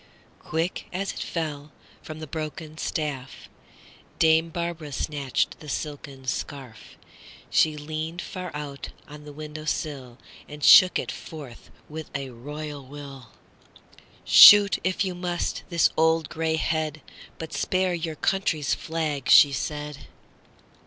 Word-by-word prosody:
Quick, 165 +3 -3
as 195 +2 -3
it - - -8
fell, 150 -3 -4 0.3
from 155 - -9
the 155 - -7
broken 155 +1 -6
staffDame 160 +3 -2
Barbara 170 -3 -4
snatched 145 +3 -2
the 150 - -10
silken 140 -2 -6
scarf; 130 -3 -6 0.5
She 155 -1 +3
leaned 155 +3 -5
far 185 -1 -6
out 145 -2 -6 0.2
on 150 0 -12
the 150 - -9
window 155 +1 -8
sill, 135 -5 -4 0.3
And 150 0 -9
shook 185 +4 +8
it - - -3
forth 145 -8 -10 0.2
with 155 +1 -8
a 135 -1 -4
royal 145 +4 -7
will."Shoot, 145 - +4
if 185 +1 0
you 185 - -3
must, 175 -1 -3
this 170 -3 +3
old 160 0 +2
gray 160 -1 -1
head, 155 -1 -2 0.4
But 160 - -7
spare 185 -1 0
your 160 -2 -3
country's 160 -4 0
flag," 155 -4 -3
she 145 - +8
said. 150 +2 -5
155 Hz, 125 wpm, -25 LUFS, 145-165 Hz, 0.5 s, shook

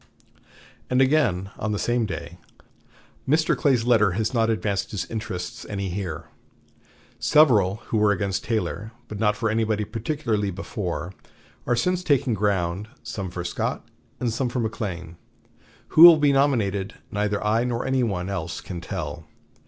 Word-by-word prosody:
And 125 - +2
again 130 -10 +2
on 110 0 -1
the - - -1
same 120 +1 0
day: 90 -2 -7 0.9
"Mr. 155 +2 +3
Clay's 130 -7 +2
letter 110 -6 +4
has 110 +5 -1
not 115 -2 +2
advanced 105 -3 -1
his 105 - -3
interests 105 -6 -5
any 100 -2 -3
here. 85 -4 -4 1.0
Several 110 -9 +4
who 110 - +1
were 105 -1 +4
against 100 -1 -1
Taylor, 110 -1 -2
but 105 - -7
not 105 -1 +2
for 110 +2 -1
anybody 110 -1 0
particularly 115 -2 -2
before, 90 -3 -4 0.5
are 120 - +3
since 180 +8 0
taking 140 -6 +2
ground, 100 -1 0 0.2
some 95 -3 -5
for 90 0 -5
Scott 85 - -3 0.3
and 120 -3 -1
some 125 +1 -1
for 125 - -2
McLean. 90 -7 -4 0.7
Who 155 - +4
will 170 -1 +11
be 145 -2 +3
nominated 110 -8 +1 0.2
neither 105 0 0
I 110 +2 +2
nor 120 -1 -2
any 130 -1 +1
one 95 -6 -1
else 90 -3 -4
can 90 -3 -7
tell. - - -5
105 Hz, 150 wpm, -24 LUFS, 95-120 Hz, 1.0 s, will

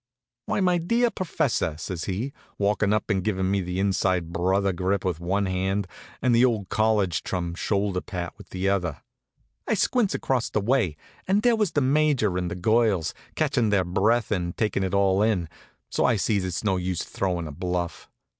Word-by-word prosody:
"Why, - - 0
my 180 -2 +3
dear 230 +8 +2
professor!" 135 - -1
says 80 +1 -5
he, 110 +9 -3 0.2
walkin' 100 0 +1
up 110 +1 0
and 95 -2 +1
givin' 95 -2 0
me 100 0 +1
the 90 +1 -3
inside 95 -3 +1
brother 95 +2 +1
grip 95 +2 -1
with 90 -4 -1
one 95 +4 0
hand 95 +2 -1 0.4
and 125 -2 +3
the 115 +1 +5
old 110 -7 +1
college 105 -5 +2
chum 85 -2 -3
shoulder 100 0 -1
pat 90 -3 -5
with - - -15
the 95 +1 -2
other. 90 -7 -1 0.6
I - - +2
squints 240 -6 +1
across 130 -3 0
the - - 0
way, 105 - +1 0.3
and 200 +3 +2
there 240 -1 +5
was 210 -6 0
the 145 - +2
Major 135 -7 +2
and 90 -1 -1
the - - -4
girls, 105 -3 +2 0.2
catchin' 115 -3 +1
their 100 -3 +2
breath 110 +7 +1
and 90 -4 -1
takin' 105 -3 0
it 95 +1 -1
all 100 0 +3
in, 105 -6 +1 0.4
so - - +1
I 125 - +4
sees 100 -1 0
it's 90 0 -3
no 95 -3 +1
use 90 -1 -2
throwin' 90 -4 -2
a - - -6
bluff. 85 +1 -3
100 Hz, 190 wpm, -25 LUFS, 90-115 Hz, 0.6 s, the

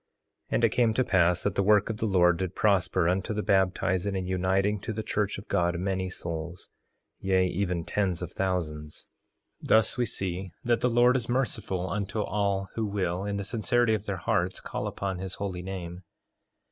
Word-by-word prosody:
3:26 - - -1
And - - +1
it - - +6
came 115 -3 +2
to 130 - +3
pass 90 -6 +2
that 100 - 0
the 100 - +1
work 105 +2 +4
of 110 - -6
the 110 - -1
Lord 90 -3 +4
did 95 0 -3
prosper 95 -4 +2
unto 95 +4 0
the 105 - -1
baptizing 95 0 +1
and 95 -1 -2
uniting 95 +3 +1
to 110 - -5
the 110 +1 -4
church 105 -1 -1
of 100 - -10
God, 85 0 +1
many 95 0 -1
souls, 85 -1 -6 0.5
yea, 95 -1 +2
even 90 -2 -1
tens 95 -4 -1
of 90 - -6
thousands. 75 -6 -3 0.6
3:27 - - -8
Thus 110 +3 +4
we - - +3
may - - +3
see 95 -1 -4
that 120 -1 +1
the 125 - +3
Lord 120 +2 +4
is 120 -3 -1
merciful 110 -7 -1
unto 105 +3 -2
all 100 -2 -1
who 110 -2 -1
will, 95 -2 -1
in 100 0 -2
the 100 - -2
sincerity 115 +3 +1
of 110 -1 -2
their 100 -2 -2
hearts, 85 - 0
call - - -4
upon 95 -2 -3
his 95 0 -5
holy 95 -3 -4
name. 90 -1 -6
95 Hz, 200 wpm, -28 LUFS, 90-105 Hz, 0.6 s, it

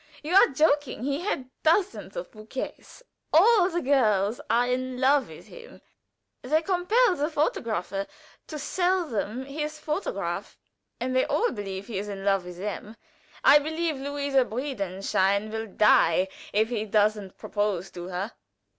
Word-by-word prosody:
You 315 +4 -3
are 390 - +8
joking. 285 -4 +1
He 280 +2 -1
had 270 -10 -3
dozens 360 +5 +1
of - - -6
bouquets. 220 - -8 0.3
All 380 +3 +6
the 345 -1 -2
girls 225 -3 +2
are 235 +2 +3
in 255 0 -2
love 270 +1 +3
with - - -12
him. 485 -1 -13 0.6
They 310 +5 +1
compelled 375 +3 +2
the 295 +2 +1
photographer 215 - -1 0.4
to 310 - -6
sell 360 +4 0
them 235 -1 -3
his 300 +2 -4
photograph, 305 +5 -3 0.4
and 255 +1 -2
they 260 - +3
all 475 - +1
believe 195 -3 -5
he 210 -4 -4
is 205 +1 -5
in 195 -1 -6
love 195 -2 +2
with 180 -1 -9
them. 210 +3 -5 0.5
I 295 - +8
believe 315 +1 -2
Luise 280 -1 +1
Breidenstein 200 -4 -1
will 220 0 -4
die 190 -3 +4 0.2
if 220 +2 +2
he 220 -3 -2
doesn't 210 -2 +1
propose 205 -3 -2
to 175 0 -7
her." 185 +4 -4
255 Hz, 150 wpm, -26 LUFS, 205-305 Hz, 0.6 s, are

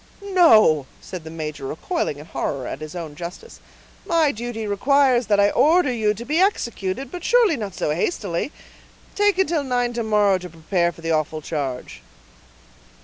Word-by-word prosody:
"No," 215 - +5
said 180 -3 -8
the 160 - -9
major, 155 -3 -6
recoiling 160 - -3
in 150 - -10
horror 140 -5 -3
at 135 - -6
his 155 +2 -8
own 165 -4 -6
justice. 175 - -9 0.4
"My 325 -4 +2
duty 230 -1 -5
requires 250 +4 +2
that 205 -1 +3
I 205 0 +4
order 315 -3 +3
you 215 -3 +1
to 235 +3 -8
be 305 +5 0
executed, 245 - -1
but 355 -1 -7
surely 465 -8 +4
not 205 -7 -6
so - - -1
hastily; 180 - -2 0.6
take 410 -2 +2
until 340 -5 +1
nine 245 -2 -1
to 235 - -2
morrow 205 -3 +3
to 180 0 -9
prepare 170 +2 -1
for 165 - -15
the 165 0 -2
awful 155 0 -1
change." 135 -6 -4
210 Hz, 170 wpm, -22 LUFS, -, 0.6 s, No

